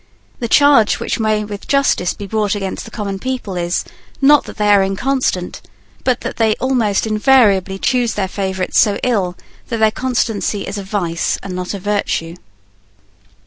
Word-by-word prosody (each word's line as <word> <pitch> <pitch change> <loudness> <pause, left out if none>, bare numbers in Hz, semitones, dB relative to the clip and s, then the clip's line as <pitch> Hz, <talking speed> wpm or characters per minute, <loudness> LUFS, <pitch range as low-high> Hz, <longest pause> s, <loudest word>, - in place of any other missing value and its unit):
The 235 - -2
charge 280 -4 +4
which - - -2
may 215 -1 +1
with 205 -1 -8
justice 275 -10 +1
be 205 - -7
brought 210 +1 0
against 195 -2 -4
the - - -9
common 200 -3 -4
people 250 -5 -4
is, 175 0 -1 0.3
not 290 +1 +5
that - - -10
they 210 -1 +1
are 200 -1 +6
inconstant, 195 -1 -1 0.4
but 250 -2 +1
that - - -5
they 220 -2 +2
almost 235 -7 0
invariably 215 -4 +3
choose 245 +1 0
their 195 -2 -1
favourite 190 -1 -3
so 205 -2 +4
ill 195 -8 0 0.3
that 230 - -3
their 220 -1 +3
constancy 225 -5 -1
is 205 +1 -5
a - - -6
vice 180 -4 -1
and 185 -2 -5
not 180 +2 -4
a - - -5
virtue. 195 -4 -2
210 Hz, 170 wpm, -17 LUFS, 195-235 Hz, 0.4 s, are